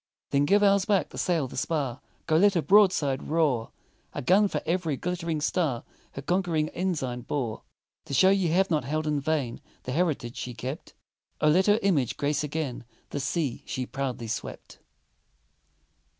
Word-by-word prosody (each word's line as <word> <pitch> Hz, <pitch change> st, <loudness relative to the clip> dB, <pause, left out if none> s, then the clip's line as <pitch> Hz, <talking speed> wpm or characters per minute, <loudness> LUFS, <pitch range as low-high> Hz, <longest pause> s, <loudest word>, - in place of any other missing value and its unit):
Then 140 Hz, +1 st, +3 dB
give 205 Hz, +6 st, +4 dB
ours 200 Hz, -1 st, +4 dB
back, 200 Hz, -3 st, +1 dB
the -, -, -11 dB
sail, 165 Hz, -6 st, +1 dB
the -, -, -10 dB
spar 135 Hz, -3 st, -2 dB, 0.2 s
Go 160 Hz, -, +1 dB
let 200 Hz, +3 st, +4 dB
her 170 Hz, -, +3 dB
broadside 170 Hz, -7 st, +3 dB
roar! 145 Hz, -8 st, +1 dB, 0.5 s
A -, -, -3 dB
gun 195 Hz, +8 st, +5 dB
for -, -, -2 dB
every 165 Hz, -5 st, 0 dB
glit'ring 170 Hz, -2 st, -2 dB
star 150 Hz, -6 st, 0 dB, 0.3 s
Her 140 Hz, -, -7 dB
conquering 170 Hz, -3 st, 0 dB
ensign 150 Hz, -10 st, -2 dB
bore. 120 Hz, -3 st, -3 dB, 0.4 s
To -, -, -7 dB
show 190 Hz, +5 st, +6 dB
ye 195 Hz, -3 st, +2 dB
have 185 Hz, +3 st, +2 dB
not 155 Hz, -4 st, +2 dB
held 155 Hz, +4 st, -2 dB
in 150 Hz, -1 st, 0 dB
vain 140 Hz, -5 st, -1 dB, 0.2 s
The 125 Hz, -, -4 dB
heritage 145 Hz, -6 st, -1 dB
she 125 Hz, -1 st, -5 dB
kept, 130 Hz, +8 st, -6 dB, 0.4 s
Oh, 150 Hz, -, +4 dB
let 185 Hz, +6 st, +4 dB
her 205 Hz, +1 st, +5 dB
image 155 Hz, -, +1 dB
grace 145 Hz, +1 st, 0 dB
again 150 Hz, -5 st, -3 dB, 0.3 s
The 145 Hz, -, -2 dB
sea 140 Hz, -1 st, -2 dB
she 130 Hz, -, -3 dB
proudly 130 Hz, -3 st, -4 dB
swept! 110 Hz, -, -6 dB
155 Hz, 170 wpm, -27 LUFS, 135-180 Hz, 0.5 s, show